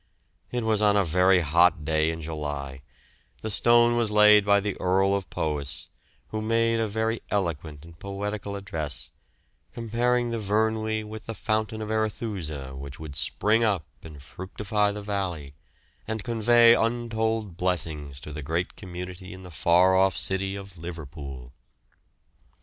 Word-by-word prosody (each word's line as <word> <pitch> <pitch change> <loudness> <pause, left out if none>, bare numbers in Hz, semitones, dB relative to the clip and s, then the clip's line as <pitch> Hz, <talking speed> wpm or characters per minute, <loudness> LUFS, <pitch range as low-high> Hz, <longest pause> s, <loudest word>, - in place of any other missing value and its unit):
It 125 -1 -2
was 110 -1 +2
on 105 -1 +4
a 100 - +4
very 90 +2 +4
hot 85 0 +3
day 80 0 +2
in 80 0 -4
July; 75 -3 -5 0.6
the 110 - -3
stone 120 +2 +4
was 120 -2 +1
laid 105 0 +7
by 100 0 +4
the 100 -1 -2
Earl 95 +2 +3
of 100 -2 -2
Powis, 75 -3 -3 0.4
who 110 - -3
made 115 +1 +2
a 110 - +1
very 110 +2 -1
eloquent 80 -6 -2
and 85 -1 -15
poetical 100 0 -4
address, 80 -7 -5 0.6
comparing 120 +1 0
the 115 - -2
Vyrnwy 110 +1 0
with 110 +1 -9
the 115 - -4
fountain 110 +1 -1
of 105 - -5
Arethusa 95 - -3
which 70 +1 -8
would 80 -3 -8
spring 105 - +2
up 100 -8 +1 0.2
and 75 -4 -11
fructify 100 +5 -2
the 105 0 -6
valley, 90 -9 -3 0.5
and 110 -1 -2
convey 115 0 +5
untold 115 -4 0
blessings 80 -6 -2
to 75 - -8
the 75 - -5
great 80 +5 -2
community 90 +1 -8
in 95 0 -11
the 90 - -10
far 85 +5 +4
off 95 -2 +3
city 95 +4 0
of 95 -3 -10
Liverpool. 70 -6 -8
95 Hz, 150 wpm, -26 LUFS, 80-110 Hz, 0.6 s, laid